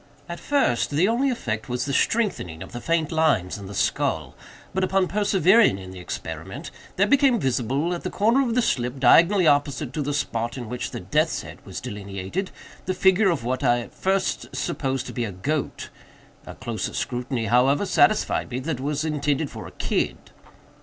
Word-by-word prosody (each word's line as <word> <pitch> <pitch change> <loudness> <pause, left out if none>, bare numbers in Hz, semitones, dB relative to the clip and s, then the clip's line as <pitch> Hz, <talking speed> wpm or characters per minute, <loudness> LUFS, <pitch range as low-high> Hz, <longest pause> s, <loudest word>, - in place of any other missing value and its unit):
At 170 - -6
first, 280 - +1
the 155 +6 +2
only 245 +5 +2
effect 110 - -3
was 125 +1 -1
the 140 - -2
strengthening 140 - 0
of - - -12
the 120 - -6
faint 165 0 0
lines 155 - +1
in 100 - -8
the 100 - -8
skull; - - 0 0.4
but, 190 - 0
upon 190 0 +2
persevering 200 - +4
in 95 -1 -9
the 95 - -9
experiment, 90 - -6 0.2
there 200 - +3
became 265 +1 +4
visible, 135 - 0
at 175 - -4
the - - -3
corner 230 +6 +3
of 235 -4 0
the 250 - +3
slip, 125 - -1
diagonally 170 +9 +5
opposite 145 -2 +1
to 150 - -2
the 145 +1 -2
spot 120 -3 -2
in 120 -4 -6
which 125 +1 -4
the - - -6
death's - - 0
head - - -11
was - - -5
delineated, 100 - -5 0.4
the 185 - 0
figure 190 +2 +4
of 165 -9 -1
what 130 +3 -2
I 120 -2 +3
at - - -11
first 190 0 -1
supposed 135 -6 -2
to - - -7
be 120 - -2
a 110 - -3
goat. 140 +12 -3 0.6
A - - -8
closer 110 -5 -4
scrutiny, 125 -1 -2
however, 125 - +3
satisfied 215 +2 +2
me 125 - -3
that 150 -1 -3
it - - -6
was 150 +2 -1
intended 145 -1 -1
for - - -8
a - - -11
kid." - - -1
145 Hz, 195 wpm, -24 LUFS, 120-190 Hz, 0.6 s, diagonally